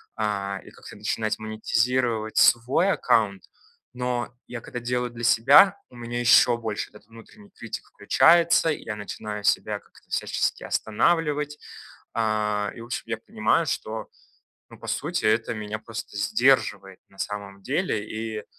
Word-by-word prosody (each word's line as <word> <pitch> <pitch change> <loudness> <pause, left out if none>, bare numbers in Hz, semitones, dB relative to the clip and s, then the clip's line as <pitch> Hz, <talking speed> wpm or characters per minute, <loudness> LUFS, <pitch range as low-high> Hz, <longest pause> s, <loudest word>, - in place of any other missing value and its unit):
а, 100 -2 -2
и - - -13
как-то - - -13
начинать 110 +1 -2
монетизировать 115 +1 0
свой 130 +11 +4
аккаунт. 110 - +1 0.5
Но, 125 -1 -2 0.2
я 120 -2 -7
когда 120 - -6
делаю 125 +1 -1
для 120 0 -9
себя, 135 - +6
у 125 - -17
меня 120 0 -5
ещё 120 0 +6
больше 110 -3 -4
этот 105 0 -18
внутренний 115 - -16
критик 115 - -8
включается. 165 +9 +4
Я 110 -8 -3
начинаю 105 0 -6
себя - - +1
как-то - - -24
всячески - - -1
останавливать. 150 +4 0 0.6
А, 105 -2 0
и 115 - -9
в - - -8
общем, 120 - -4
я 115 -1 -2
понимаю, 110 -1 0
что, - - -3 0.6
ну, - - -14
по - - -10
сути, - - -2
это 110 +2 +2
меня 105 0 -5
просто 115 -1 -8
сдерживает 110 -3 +2
на 95 - -23
самом 100 -1 -5
деле. 135 - -1
И, 110 -1 -5
115 Hz, 145 wpm, -25 LUFS, 105-125 Hz, 0.6 s, себя